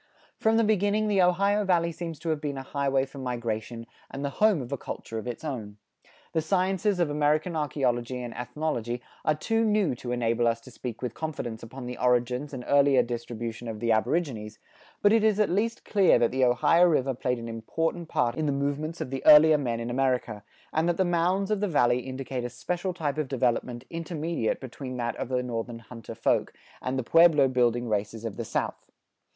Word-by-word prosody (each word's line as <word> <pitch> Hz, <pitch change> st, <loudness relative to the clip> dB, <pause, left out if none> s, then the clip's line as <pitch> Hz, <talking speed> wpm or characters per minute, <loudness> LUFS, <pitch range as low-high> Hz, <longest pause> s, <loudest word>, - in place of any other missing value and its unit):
From 220 Hz, 0 st, +3 dB
the 230 Hz, -, +4 dB
beginning 210 Hz, 0 st, +2 dB
the 200 Hz, -2 st, +3 dB
Ohio 200 Hz, +4 st, +3 dB
Valley 170 Hz, -3 st, +2 dB
seems 165 Hz, -1 st, -6 dB
to 165 Hz, -, -3 dB
have 155 Hz, -2 st, -1 dB
been 145 Hz, -2 st, -3 dB
a 135 Hz, -, -5 dB
highway 135 Hz, -1 st, 0 dB
for 135 Hz, +1 st, -11 dB
migration, 115 Hz, -2 st, -4 dB, 0.2 s
and 140 Hz, +1 st, -5 dB
the 140 Hz, -, -2 dB
home 215 Hz, -5 st, +5 dB
of 125 Hz, -1 st, -7 dB
a -, -, 0 dB
culture 115 Hz, -2 st, -6 dB
of 110 Hz, -, -8 dB
its 120 Hz, +3 st, -5 dB
own. 110 Hz, -9 st, -5 dB, 0.6 s
The 160 Hz, -, +2 dB
sciences 190 Hz, +3 st, +1 dB
of 170 Hz, -4 st, +1 dB
American 150 Hz, +3 st, +1 dB
archeology 130 Hz, -5 st, -1 dB
and 120 Hz, -1 st, -6 dB
ethnology 125 Hz, -3 st, -3 dB, 0.2 s
are 155 Hz, -, +2 dB
too 225 Hz, +9 st, 0 dB
new 210 Hz, -, +2 dB
to 120 Hz, -, -5 dB
enable 120 Hz, -1 st, +1 dB
us 115 Hz, 0 st, +1 dB
to 130 Hz, -, -14 dB
speak 120 Hz, 0 st, -7 dB
with 120 Hz, -3 st, -3 dB
confidence 130 Hz, -8 st, -5 dB
upon 125 Hz, +3 st, -9 dB
the 125 Hz, 0 st, -6 dB
origins 125 Hz, +3 st, +1 dB
and 125 Hz, -3 st, -7 dB
earlier 140 Hz, -1 st, +5 dB
distribution 120 Hz, -1 st, -5 dB
of 110 Hz, -2 st, -5 dB
the 115 Hz, +1 st, 0 dB
aborigines, 110 Hz, -3 st, 0 dB, 0.5 s
but 205 Hz, +1 st, +6 dB
it 225 Hz, -1 st, +4 dB
is 215 Hz, -1 st, +3 dB
at 210 Hz, -, +2 dB
least 225 Hz, +5 st, -1 dB
clear 195 Hz, -, +4 dB
that 120 Hz, -1 st, +2 dB
the 130 Hz, 0 st, +2 dB
Ohio 125 Hz, +8 st, +4 dB
river 135 Hz, -5 st, +2 dB
played 125 Hz, 0 st, -1 dB
an 115 Hz, 0 st, -7 dB
important 160 Hz, +9 st, -3 dB
part 120 Hz, -1 st, +1 dB
in 155 Hz, +4 st, -2 dB
the -, -, +2 dB
movements 145 Hz, +4 st, -2 dB
of 130 Hz, -, -4 dB
the 135 Hz, -, -4 dB
earlier 155 Hz, 0 st, +8 dB
men 120 Hz, -4 st, -2 dB
in 115 Hz, +1 st, -4 dB
America, 125 Hz, -5 st, 0 dB, 0.3 s
and 160 Hz, +2 st, +2 dB
that 170 Hz, -, 0 dB
the 190 Hz, -, +2 dB
mounds 180 Hz, +4 st, +1 dB
of 210 Hz, -, +1 dB
the 205 Hz, -, 0 dB
valley 125 Hz, -7 st, +3 dB
indicate 130 Hz, 0 st, -5 dB
a 120 Hz, -, -3 dB
special 175 Hz, +9 st, -3 dB
type 155 Hz, -3 st, -2 dB
of 150 Hz, -, -1 dB
development 125 Hz, -1 st, -1 dB
intermediate 165 Hz, -6 st, -2 dB
between 130 Hz, 0 st, -7 dB
that 120 Hz, -1 st, -2 dB
of -, -, -4 dB
the 125 Hz, -1 st, 0 dB
northern 120 Hz, -1 st, -4 dB
hunter 115 Hz, 0 st, -10 dB
folk, 115 Hz, -, +1 dB, 0.3 s
and 130 Hz, +1 st, -2 dB
the 130 Hz, -, -1 dB
pueblo 160 Hz, 0 st, +5 dB
building 120 Hz, -1 st, +1 dB
races 110 Hz, +1 st, -2 dB
of 110 Hz, -, -4 dB
the -, -, -4 dB
south. -, -, -3 dB
135 Hz, 205 wpm, -27 LUFS, 120-165 Hz, 0.6 s, earlier